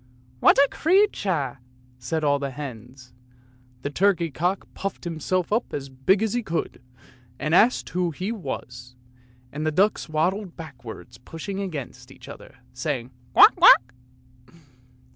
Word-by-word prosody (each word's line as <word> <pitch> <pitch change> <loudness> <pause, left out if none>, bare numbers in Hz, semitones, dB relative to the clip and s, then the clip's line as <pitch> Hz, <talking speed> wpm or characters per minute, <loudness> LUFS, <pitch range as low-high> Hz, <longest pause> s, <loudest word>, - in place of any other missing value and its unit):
"What - - +5
a 280 +1 +6
creature!" 205 - +1 0.4
said 155 +6 -3
all 145 -1 +2
the 140 -1 -3
hens. 130 -2 -9 0.7
The 140 - -3
turkey 175 -1 +1
cock 175 +9 -2
puffed 195 0 -5
himself 175 +3 -2
up 235 +3 -1
as 140 -1 -5
big 135 +11 +1
as 220 - -1
he 245 - 0
could, 170 - -4 0.6
and 155 +4 -2
asked 230 +8 +4
who 180 -1 -1
he 185 +7 -4
was; 125 - -7 0.6
and 150 +3 -5
the 155 - 0
ducks 195 +2 +1
waddled 180 +5 -1
backwards, 125 -6 -10
pushing 165 +9 -7
against 140 -9 -6
each 135 - -14
other, 140 -1 -12 0.2
saying, 125 -2 -3
" 125 0 -30
Quack, - - +8
quack! 125 +1 +7
155 Hz, 145 wpm, -24 LUFS, 130-190 Hz, 0.7 s, Quack